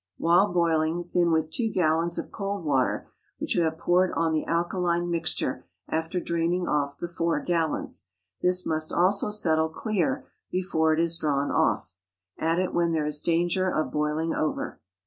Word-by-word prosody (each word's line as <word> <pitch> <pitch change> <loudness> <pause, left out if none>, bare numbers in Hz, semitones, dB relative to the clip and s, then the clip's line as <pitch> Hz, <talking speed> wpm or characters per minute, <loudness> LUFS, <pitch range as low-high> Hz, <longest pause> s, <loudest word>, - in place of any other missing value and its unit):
While 175 +4 +4
boiling, 165 -1 +1
thin 175 0 +1
with 160 -1 +1
two 225 +5 0
gallons 170 -1 +1
of - - -5
cold 200 -3 -4
water, 135 -4 0 0.3
which - - -2
you - - +2
have 160 0 -1
poured 180 +2 +2
on 165 -1 +1
the 155 -1 -1
alkaline 175 0 0
mixture 165 -1 -2 0.2
after 160 +3 -1
draining 170 +1 0
off 145 -1 0
the 175 - -4
four 170 -2 0
gallons. 165 -1 -1 0.3
This 180 0 +2
must 155 0 -1
also 195 +4 +2
settle 160 -6 +1
clear 230 - -1 0.2
before 170 -4 +1
it 155 - +2
is 165 0 +1
drawn 145 -2 0
off. - - +1 0.5
Add 165 +1 +1
it 185 0 0
when 170 -1 +2
there 155 -2 +1
is 150 0 -1
danger 175 +2 +1
of 155 -3 -1
boiling 150 +2 0
over. 155 - -2
170 Hz, 165 wpm, -26 LUFS, 160-180 Hz, 0.5 s, While